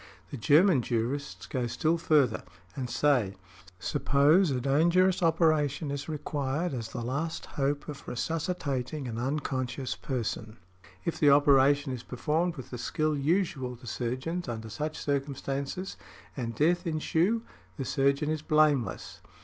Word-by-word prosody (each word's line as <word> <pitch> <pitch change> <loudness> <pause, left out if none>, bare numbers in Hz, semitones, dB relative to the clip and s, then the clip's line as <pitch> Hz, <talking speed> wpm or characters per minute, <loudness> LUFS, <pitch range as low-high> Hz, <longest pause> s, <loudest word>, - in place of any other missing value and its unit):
The 140 - -5
German 150 - +5
Jurists 115 -5 -2
go 125 +6 -2
still 155 +8 0
further 145 -8 +3 0.3
and 130 -3 -4
say, 120 -7 +2 0.4
suppose 145 - +3
a 130 -2 0
dangerous 170 +8 +3
operation 155 -3 +2
is 140 +2 -4
required 150 +1 -2
as 115 -3 -4
the 120 - -5
last 150 +7 -3
hope 145 0 -2
of 145 -2 -8
resuscitating 145 -1 -2
an 115 -1 -4
unconscious 130 -1 -2
person; 115 -3 -4 0.5
if 170 - -2
the 145 - +6
operation 140 0 +5
is 125 - -5
performed 160 +8 -1
with 130 -5 -9
the 125 - -5
skill 155 +5 0
usual 145 -4 0
to 125 +1 -15
surgeons 130 +9 -3
under 110 -1 -5
such 155 +5 -3
circumstances, 140 +4 -3 0.4
and 115 -4 -4
death 175 - +2
ensue, 165 +7 +1 0.3
the 135 - -3
surgeon 140 +3 +1
is 155 -2 -2
blameless. 155 -5 +1
140 Hz, 135 wpm, -29 LUFS, 125-155 Hz, 0.5 s, the